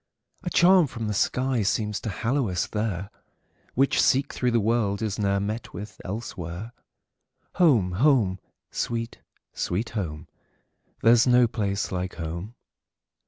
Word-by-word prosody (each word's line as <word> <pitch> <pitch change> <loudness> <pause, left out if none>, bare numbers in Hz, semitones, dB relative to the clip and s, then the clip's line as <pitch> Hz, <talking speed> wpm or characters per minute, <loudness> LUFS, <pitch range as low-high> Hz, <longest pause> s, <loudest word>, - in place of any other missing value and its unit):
A - - -3
charm 180 -2 +5
from 115 -3 -5
the 105 - -1
sky 125 +4 +1
seems 105 +1 0
to 110 - -4
hallow 115 - 0
us 90 -1 0
there, 105 -3 -3 0.6
Which, 135 +2 +3
seek 135 +2 +2
through 125 - 0
the 120 -1 +2
world, 110 -1 0
is 105 -2 -2
ne'er 100 -1 +1
met 105 +2 -4
with 105 +4 -8
elsewhere. 95 -1 -6 0.9
Home! 130 - +4
home! 105 -3 +3 0.3
sweet, 115 0 -3 0.3
sweet 105 +7 -2
home! 85 -7 -4 0.8
There 115 +1 +7
's 120 +2 +3
no 125 0 +6
place 100 -3 -2
like 90 0 -3
home! 85 +7 -6
110 Hz, 140 wpm, -26 LUFS, 95-120 Hz, 0.9 s, There